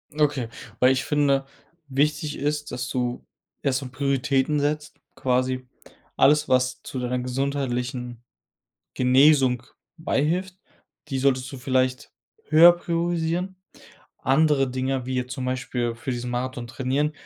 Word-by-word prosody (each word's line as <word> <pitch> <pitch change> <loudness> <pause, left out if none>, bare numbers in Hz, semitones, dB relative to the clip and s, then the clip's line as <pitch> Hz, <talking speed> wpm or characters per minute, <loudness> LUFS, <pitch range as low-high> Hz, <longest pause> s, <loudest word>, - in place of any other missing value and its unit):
Okay, 145 -5 +1 0.3
weil 125 +1 +6
ich 130 0 0
finde, 140 -2 +2 0.4
wichtig 150 +2 0
ist, 145 0 -2
dass 125 0 -4
du 125 -1 -2 0.4
erst 135 -1 +1
so 130 - -7
Prioritäten 140 +2 +1
setzt, 150 +1 -2 0.2
quasi 130 -1 0 0.5
alles, 150 +1 +4
was 130 0 +1
zu 130 - -6
deiner 125 0 -1
gesundheitlichen 125 -2 -3 0.7
Genesung 130 -1 +4 0.3
beihilft, 175 +5 -1 0.5
die 135 -2 -1
solltest 130 -1 +1
du 135 - -7
vielleicht 130 0 0 0.3
höher 165 +3 +8
priorisieren. 175 +2 -1 0.6
Andere 135 0 +3
Dinge, 130 0 -2
wie 130 - -3
jetzt 125 0 -2
zum 130 - -4
Beispiel 125 -2 -2
für 120 +3 -7
diesen 120 0 -4
Marathon 125 0 -3
trainieren, 135 +4 -1
130 Hz, 125 wpm, -24 LUFS, 125-150 Hz, 0.7 s, höher